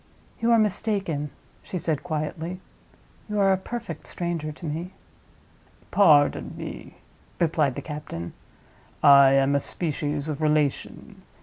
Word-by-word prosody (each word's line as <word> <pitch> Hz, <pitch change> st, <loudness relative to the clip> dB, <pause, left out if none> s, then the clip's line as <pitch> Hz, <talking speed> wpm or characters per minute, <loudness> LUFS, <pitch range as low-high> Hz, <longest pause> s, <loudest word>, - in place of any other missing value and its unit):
"You 230 Hz, -, +1 dB
are 230 Hz, -, +6 dB
mistaken," 195 Hz, -8 st, 0 dB, 0.3 s
she 185 Hz, -, -5 dB
said, 160 Hz, -4 st, -1 dB
quietly. 165 Hz, +2 st, -4 dB, 0.7 s
"You 210 Hz, 0 st, -1 dB
are 195 Hz, -1 st, +5 dB
a -, -, +1 dB
perfect 235 Hz, +5 st, -7 dB
stranger 170 Hz, -3 st, -3 dB
to 160 Hz, +3 st, -10 dB
me." 165 Hz, +5 st, -4 dB, 1.0 s
"Pardon 150 Hz, -8 st, +4 dB
me," -, -, -8 dB, 0.4 s
replied 155 Hz, -6 st, +1 dB
the -, -, -6 dB
captain; 150 Hz, -, -6 dB, 0.7 s
"I 140 Hz, -1 st, +8 dB
am 135 Hz, +1 st, +3 dB
a 140 Hz, -, +3 dB
species 150 Hz, -1 st, -3 dB
of 155 Hz, -1 st, -4 dB
relation. 150 Hz, -2 st, -1 dB
155 Hz, 125 wpm, -25 LUFS, 145-185 Hz, 1.0 s, I